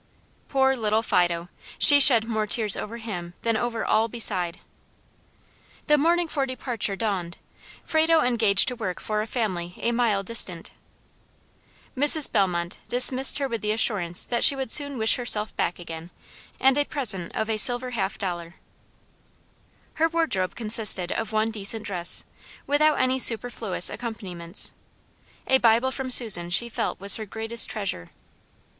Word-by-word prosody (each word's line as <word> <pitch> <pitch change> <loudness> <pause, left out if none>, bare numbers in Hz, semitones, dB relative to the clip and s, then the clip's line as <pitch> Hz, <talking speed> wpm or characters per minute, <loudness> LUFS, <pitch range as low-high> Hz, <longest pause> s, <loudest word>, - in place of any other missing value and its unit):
Poor 265 -1 +1
little 220 -2 -2
Fido! 175 -4 -1 0.3
She 285 -1 +9
shed 250 -5 +8
more 220 -2 -3
tears 215 -1 +2
over 225 +2 -8
him 180 -7 -8
than 230 -1 -1
over 230 0 -4
all 220 +1 0
beside. 185 -6 -3 1.3
The 300 - +2
morning 335 +4 0
for 275 -3 -3
departure 245 -5 -4
dawned. 190 -5 -5 0.5
Frado 320 +1 +1
engaged 225 -5 +2
to 250 - -7
work 190 -7 -6
for 215 -1 -4
a 215 - -6
family 185 -7 -5
a 235 - -3
mile 230 -4 -1
distant. 185 -6 0 1.2
Mrs. 290 +2 +3
Bellmont 180 -5 -2
dismissed 255 +2 +3
her 280 -1 -2
with 230 -4 -6
the 210 - -4
assurance 195 -6 +1
that 240 -1 -2
she 280 - +8
would 265 -3 -6
soon 285 -2 +2
wish 220 -1 +3
herself 220 -4 0
back 175 - -3
again, 165 -1 -10 0.5
and 270 +1 +2
a 290 - 0
present 210 - -1
of 220 - -3
a 220 -1 -3
silver 245 +3 +3
half 195 -4 -4
dollar. 175 -2 -6 1.5
Her 325 - +2
wardrobe 320 - -2
consisted 215 -5 +3
of 225 -2 -4
one 220 +1 -1
decent 215 0 -3
dress, 180 -4 -1 0.4
without 295 +1 +1
any 255 0 -1
superfluous 230 -6 +2
accompaniments. 195 -7 -5 0.7
A 265 - +1
Bible 235 +2 +1
from 260 0 -6
Susan 210 -9 +3
she 235 +7 +2
felt - - -5
was 200 +1 +1
her 220 - -7
greatest 225 +3 -1
treasure. 195 - -4
225 Hz, 150 wpm, -23 LUFS, 195-255 Hz, 1.5 s, She